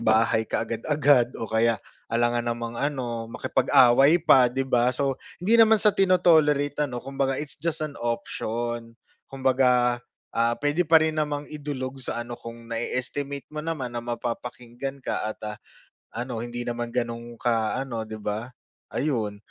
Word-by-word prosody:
bahay 110 Hz, 0 st, +2 dB
kaagad-agad 130 Hz, +1 st, +2 dB
o 115 Hz, -, -4 dB
kaya 110 Hz, +1 st, +2 dB, 0.3 s
alangan 120 Hz, 0 st, +1 dB
namang 115 Hz, 0 st, -3 dB
ano 120 Hz, -5 st, -2 dB
makipag-away 135 Hz, +6 st, +4 dB
pa, 135 Hz, -7 st, +5 dB
'di 135 Hz, +2 st, -2 dB
ba. 125 Hz, -2 st, +2 dB
So 135 Hz, -2 st, -1 dB, 0.2 s
hindi 230 Hz, +4 st, +6 dB
naman 220 Hz, 0 st, +7 dB
sa 210 Hz, -1 st, +4 dB
tino-tolerate 150 Hz, -6 st, +3 dB
ano 125 Hz, -1 st, -6 dB
kumbaga 135 Hz, -1 st, -1 dB
it's 150 Hz, -1 st, -5 dB
just 160 Hz, 0 st, -1 dB
an 145 Hz, -2 st, -7 dB
option, 120 Hz, 0 st, -3 dB, 0.3 s
kumbaga, 125 Hz, -2 st, +2 dB, 0.3 s
ah, 115 Hz, +1 st, +2 dB
puwede 150 Hz, +3 st, 0 dB
pa 160 Hz, -, +7 dB
rin 155 Hz, -1 st, 0 dB
namang 145 Hz, -1 st, -2 dB
idulog 135 Hz, -3 st, -5 dB
sa 120 Hz, -2 st, -3 dB
ano 120 Hz, -, -8 dB
kung 115 Hz, 0 st, -10 dB
na-e-estimate 135 Hz, +4 st, -3 dB
mo 150 Hz, -, -4 dB
naman 150 Hz, -6 st, -4 dB
na 120 Hz, -, -3 dB
mapapakinggan 120 Hz, +2 st, -5 dB
ka -, -, -2 dB
at 110 Hz, -, -6 dB
ah, 105 Hz, 0 st, -5 dB, 0.6 s
ano 120 Hz, -1 st, -4 dB
hindi 120 Hz, 0 st, -5 dB
naman 120 Hz, 0 st, -3 dB
gano'n 120 Hz, 0 st, -4 dB
ka 115 Hz, -1 st, 0 dB
ano 130 Hz, -4 st, -3 dB
'di 110 Hz, 0 st, -6 dB
ba. 105 Hz, +2 st, -4 dB, 0.4 s
Ayun, 110 Hz, -9 st, -1 dB
125 Hz, 150 wpm, -25 LUFS, 115-145 Hz, 0.6 s, naman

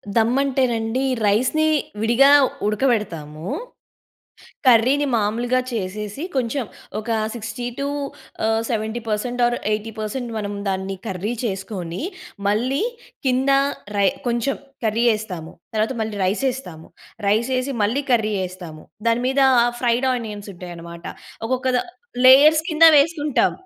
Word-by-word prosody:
దమ్ 230 Hz, +2 st, +3 dB
అంటేనండి 255 Hz, -3 st, 0 dB, 0.2 s
రైస్‌ని 255 Hz, +10 st, +2 dB, 0.3 s
విడిగా 240 Hz, +5 st, +5 dB, 0.4 s
ఉడకబెడతాము. 200 Hz, -, -1 dB, 1.2 s
కర్రీ‌ని 255 Hz, +4 st, +5 dB
మామూలుగా 235 Hz, +4 st, +1 dB
చేసేసి 210 Hz, -, -4 dB
కొంచెం 255 Hz, +1 st, 0 dB, 0.3 s
ఒక 215 Hz, +2 st, -7 dB, 0.3 s
60 230 Hz, +1 st, -5 dB
టూ 280 Hz, -, -1 dB, 0.6 s
ఆహ్, 225 Hz, 0 st, +2 dB
70 220 Hz, +1 st, -2 dB
పర్సెంట్ 240 Hz, +4 st, -2 dB
ఆర్ 240 Hz, 0 st, 0 dB, 0.2 s
80 215 Hz, +1 st, -3 dB
పర్సెంట్ 235 Hz, +3 st, -4 dB
మనం 205 Hz, -1 st, -4 dB
దాన్ని 190 Hz, 0 st, -2 dB
కర్రీ 195 Hz, +3 st, -3 dB
చేసుకొని, 190 Hz, -3 st, -4 dB, 0.5 s
మళ్ళీ 250 Hz, -, +1 dB, 0.4 s
కింద 260 Hz, +2 st, +2 dB, 0.5 s
రై 200 Hz, -1 st, +4 dB, 0.2 s
కొంచెం 240 Hz, +3 st, 0 dB, 0.3 s
కర్రీ 225 Hz, +2 st, +1 dB
ఎస్తాము. 180 Hz, -7 st, -7 dB, 0.2 s
తరువాత 220 Hz, +4 st, 0 dB
మళ్ళీ 220 Hz, -1 st, -3 dB
రైసేస్తాము. 210 Hz, -5 st, -2 dB, 0.4 s
రైసేసి 255 Hz, +5 st, +1 dB
మళ్ళీ 235 Hz, +8 st, +1 dB
కర్రీ 220 Hz, -3 st, +2 dB
ఎస్తాము. 175 Hz, -4 st, -10 dB, 0.2 s
దాని 230 Hz, +1 st, +2 dB
మీద 265 Hz, +1 st, +1 dB, 0.4 s
ఫ్రైడ్ 245 Hz, +1 st, +2 dB
ఆనియన్స్ 215 Hz, -4 st, -6 dB
ఉంటాయన్నమాట. 170 Hz, -1 st, -9 dB, 0.4 s
ఒక్కొక్క 255 Hz, +2 st, -1 dB
ద -, -, +3 dB, 0.5 s
లేయర్స్ 300 Hz, +4 st, +8 dB
కింద 320 Hz, +1 st, +5 dB
వేసుకుంటాం. 295 Hz, -1 st, +2 dB
225 Hz, 115 wpm, -22 LUFS, 205-255 Hz, 1.2 s, లేయర్స్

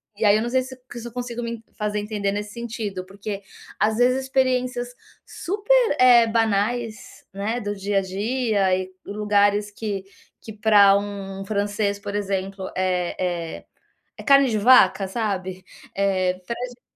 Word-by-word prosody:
e 215 Hz, +2 st, -1 dB
aí 205 Hz, 0 st, +6 dB
eu 215 Hz, -, +2 dB
não 240 Hz, -, -2 dB
sei 260 Hz, +1 st, +2 dB
se 260 Hz, 0 st, -10 dB, 0.2 s
se 240 Hz, 0 st, -7 dB
eu -, -, -9 dB
consigo 240 Hz, -1 st, -4 dB
me 235 Hz, -1 st, -5 dB
fazer 210 Hz, 0 st, -2 dB
entender 205 Hz, -1 st, -2 dB
nesse 205 Hz, 0 st, -4 dB
sentido, 225 Hz, -5 st, -5 dB
porque, 200 Hz, +1 st, -6 dB, 0.4 s
às 215 Hz, +2 st, +2 dB
vezes, 255 Hz, +2 st, +3 dB
experiências 255 Hz, -2 st, 0 dB, 0.4 s
super, 420 Hz, +1 st, +1 dB
eh, 245 Hz, -2 st, +7 dB
banais, 225 Hz, 0 st, -1 dB
né, 210 Hz, +5 st, -2 dB
do 205 Hz, -1 st, -3 dB
dia 200 Hz, 0 st, -2 dB
a -, -, -1 dB
dia 200 Hz, 0 st, 0 dB
e 185 Hz, 0 st, -5 dB
lugares 205 Hz, 0 st, +1 dB
que 205 Hz, -2 st, -4 dB, 0.4 s
que, 220 Hz, -, -7 dB
para 205 Hz, -2 st, +5 dB
um 195 Hz, -1 st, -6 dB
francês, 205 Hz, 0 st, -1 dB
por 200 Hz, 0 st, -7 dB
exemplo, 195 Hz, -1 st, -3 dB
é 180 Hz, -1 st, 0 dB, 0.4 s
é -, -, -16 dB, 0.5 s
é -, -, -9 dB
carne 275 Hz, -1 st, +5 dB
de 220 Hz, -, 0 dB
vaca, 210 Hz, -3 st, +5 dB
sabe. 190 Hz, -3 st, -3 dB, 0.3 s
Eh, 190 Hz, -2 st, +1 dB
para 235 Hz, -, -2 dB
a 250 Hz, -, -2 dB
gente 245 Hz, 0 st, -15 dB
210 Hz, 165 wpm, -23 LUFS, 200-240 Hz, 0.5 s, eh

